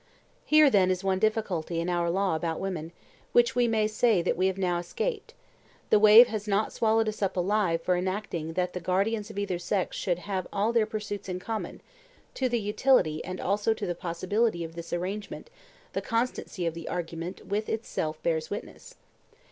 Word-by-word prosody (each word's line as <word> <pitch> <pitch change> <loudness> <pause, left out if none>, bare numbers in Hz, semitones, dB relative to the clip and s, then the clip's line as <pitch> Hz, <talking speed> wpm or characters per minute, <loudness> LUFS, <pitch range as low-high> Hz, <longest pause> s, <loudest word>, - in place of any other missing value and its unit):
Here, 305 -2 +6
then, 190 -4 +4
is 185 0 -1
one 190 -1 +1
difficulty 195 -6 0
in 170 - -2
our 175 -1 0
law 190 -1 +1
about 160 0 -2
women, 175 -4 -4 0.4
which 240 0 +4
we 245 -1 +3
may 220 -2 +2
say 215 -3 +2
that - - +1
we 185 +2 +2
have 190 0 -2
now 180 -2 0
escaped; 425 - -4 0.6
the 215 - +6
wave 215 +3 +9
has 215 -2 -4
not 205 +1 +1
swallowed 225 0 +2
us 215 0 -4
up 195 -2 -1
alive 180 -3 +1
for 180 - +2
enacting 180 -3 -3
that 180 +1 -1
the 180 - -3
guardians 200 +5 0
of 215 - -10
either 195 -3 -2
sex 185 +2 -1
should 175 -3 -1
have 185 0 -4
all 210 +3 0
their 225 -2 +3
pursuits 205 -2 -5
in 180 - -2
common; 220 +4 -5 0.5
to 260 -1 0
the 240 -1 +1
utility 210 - +2
and 185 +1 -6
also 205 +3 +1
to 210 - -4
the 175 - -1
possibility 180 +3 -1
of 165 0 -7
this 170 0 -8
arrangement 200 - -4 0.4
the - - -1
consistency 230 -5 -2
of 165 - 0
the 165 -1 -7
argument 170 +1 -5
with 210 +2 -2
itself 160 -8 -3
bears 160 -2 0
witness. - - -8
195 Hz, 190 wpm, -28 LUFS, 175-215 Hz, 0.6 s, wave